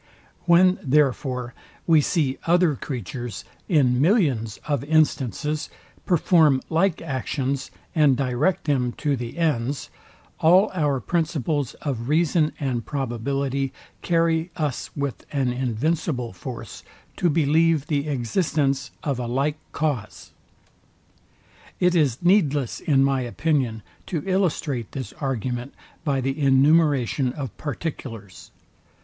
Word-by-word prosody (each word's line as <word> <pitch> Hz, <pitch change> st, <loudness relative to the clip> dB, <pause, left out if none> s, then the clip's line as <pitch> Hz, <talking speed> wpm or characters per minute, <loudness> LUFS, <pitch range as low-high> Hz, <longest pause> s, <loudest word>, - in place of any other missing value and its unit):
When 180 Hz, +2 st, +5 dB
therefore 130 Hz, -3 st, +1 dB, 0.3 s
we 160 Hz, -3 st, +5 dB
see 145 Hz, -3 st, 0 dB
other 175 Hz, -3 st, +4 dB
creatures, 120 Hz, -2 st, -6 dB, 0.2 s
in 130 Hz, -7 st, +3 dB
millions 140 Hz, -, +2 dB
of 145 Hz, -4 st, 0 dB
instances, 150 Hz, -1 st, +1 dB, 0.4 s
perform 160 Hz, -5 st, +4 dB
like 170 Hz, +1 st, +1 dB
actions, 135 Hz, -1 st, -2 dB, 0.2 s
and 150 Hz, -6 st, +4 dB
direct 135 Hz, +7 st, 0 dB
them 130 Hz, -5 st, 0 dB
to 145 Hz, -2 st, -1 dB
the 120 Hz, +3 st, -6 dB
ends, 145 Hz, -5 st, -1 dB, 0.5 s
all 185 Hz, +6 st, +5 dB
our 145 Hz, -6 st, +1 dB
principles 150 Hz, -2 st, -1 dB
of 125 Hz, -4 st, -3 dB
reason 160 Hz, 0 st, +2 dB
and 130 Hz, -5 st, -1 dB
probability 135 Hz, +2 st, -2 dB, 0.3 s
carry 165 Hz, -1 st, +1 dB
us 150 Hz, -6 st, -2 dB
with 140 Hz, -2 st, -3 dB
an 135 Hz, -4 st, 0 dB
invincible 125 Hz, -, -1 dB
force 90 Hz, -, -8 dB, 0.4 s
to 175 Hz, -, +2 dB
believe 160 Hz, 0 st, +3 dB
the 145 Hz, -2 st, -1 dB
existence 140 Hz, -, 0 dB
of 140 Hz, -5 st, -1 dB
a 120 Hz, -, -3 dB
like 140 Hz, +5 st, -1 dB
cause. 140 Hz, -9 st, -3 dB, 1.5 s
It 180 Hz, 0 st, +3 dB
is 145 Hz, -5 st, +1 dB
needless 150 Hz, -, +2 dB
in 135 Hz, -3 st, +3 dB
my 135 Hz, -1 st, +2 dB
opinion 125 Hz, -3 st, -1 dB, 0.2 s
to 160 Hz, -5 st, -3 dB
illustrate 160 Hz, -, -1 dB
this 130 Hz, -6 st, -5 dB
argument 125 Hz, -1 st, -3 dB, 0.3 s
by 140 Hz, -4 st, 0 dB
the 135 Hz, +3 st, -2 dB
enumeration 140 Hz, -2 st, +3 dB
of 130 Hz, -9 st, -6 dB
particulars. 120 Hz, -, -6 dB
140 Hz, 115 wpm, -24 LUFS, 125-160 Hz, 1.5 s, When